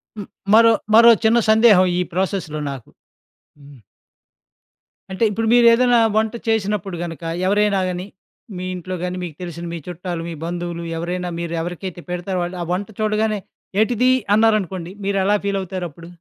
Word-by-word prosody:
హ్మ్, 205 Hz, -3 st, -7 dB, 0.3 s
మరో 230 Hz, +1 st, +7 dB, 0.2 s
మరో 235 Hz, +1 st, +9 dB
చిన్న 225 Hz, +2 st, +5 dB
సందేహం 220 Hz, -4 st, +6 dB
ఈ -, -, +2 dB
ప్రాసెస్‌లో 185 Hz, -4 st, -2 dB
నాకు. 135 Hz, -4 st, -9 dB, 0.7 s
హ్మ్. 140 Hz, -2 st, -16 dB, 1.3 s
అంటే 190 Hz, +4 st, -2 dB
ఇప్పుడు 225 Hz, +2 st, -2 dB
మీరేదైనా 240 Hz, 0 st, +5 dB, 0.2 s
వంట 220 Hz, 0 st, +1 dB
చేసినప్పుడు 210 Hz, -3 st, -1 dB
గనుక 165 Hz, -1 st, -7 dB, 0.3 s
ఎవరైనా 205 Hz, 0 st, +2 dB
గానీ, 180 Hz, +1 st, -5 dB, 0.5 s
మీ 180 Hz, -, -5 dB
ఇంట్లో 185 Hz, +1 st, -5 dB
గానీ, 180 Hz, 0 st, -3 dB
మీకు 160 Hz, -4 st, -7 dB
తెలిసిన 170 Hz, -1 st, -6 dB
మీ -, -, -4 dB
చుట్టాలు, 175 Hz, -1 st, -5 dB
మీ -, -, -5 dB
బంధువులు 175 Hz, 0 st, -4 dB
ఎవరైనా 180 Hz, +2 st, -3 dB
మీరెవరికైతే 170 Hz, +2 st, -5 dB
పెడతారో, 180 Hz, +1 st, -3 dB
వాళ్లు 175 Hz, +1 st, -5 dB
ఆ -, -, -5 dB
వంట 195 Hz, +3 st, -3 dB
చూడగానే 215 Hz, 0 st, 0 dB, 0.4 s
ఏంటిది 245 Hz, +3 st, +2 dB, 0.2 s
అన్నారనుకోండి, 195 Hz, -6 st, +1 dB
మీరెలా 195 Hz, +1 st, +2 dB
ఫీల్ 200 Hz, -1 st, 0 dB
అవుతారప్పుడు? 175 Hz, -3 st, -7 dB
190 Hz, 140 wpm, -20 LUFS, 175-215 Hz, 1.3 s, మరో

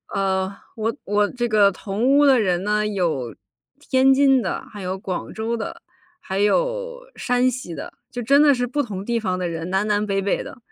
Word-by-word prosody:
呃， 190 Hz, -1 st, 0 dB, 0.3 s
我 225 Hz, +2 st, -1 dB
我 205 Hz, +1 st, +1 dB
这 240 Hz, -1 st, -2 dB
个 210 Hz, -2 st, +5 dB
同 205 Hz, +5 st, -2 dB
屋 290 Hz, -, +5 dB
的 270 Hz, -3 st, +5 dB
人 180 Hz, -4 st, 0 dB
呢， 210 Hz, +1 st, +1 dB
有 165 Hz, -, -2 dB, 0.5 s
天 265 Hz, -2 st, +4 dB
津 270 Hz, -1 st, +4 dB
的， 190 Hz, -, -3 dB
还 205 Hz, -, -9 dB
有 185 Hz, +1 st, -3 dB
广 185 Hz, -1 st, -5 dB
州 225 Hz, +2 st, -2 dB
的， 220 Hz, -, -6 dB, 0.4 s
还 190 Hz, +1 st, -3 dB
有 -, -, 0 dB, 0.2 s
山 250 Hz, +1 st, +2 dB
西 230 Hz, -9 st, -6 dB
的。 -, -, -7 dB, 0.2 s
就 245 Hz, -, -5 dB
真 275 Hz, +5 st, +4 dB
的 295 Hz, -1 st, +6 dB
是 245 Hz, 0 st, -1 dB
不 285 Hz, +4 st, -1 dB
同 200 Hz, -7 st, -5 dB
地 235 Hz, +2 st, -1 dB
方 185 Hz, -4 st, -2 dB
的 180 Hz, -1 st, -2 dB
人， 165 Hz, +1 st, -5 dB
南 195 Hz, +2 st, +1 dB
南 210 Hz, 0 st, +1 dB
北 195 Hz, -1 st, 0 dB
北 195 Hz, 0 st, 0 dB
的， -, -, -10 dB
210 Hz, 220 characters per minute, -22 LUFS, 190-250 Hz, 0.5 s, 的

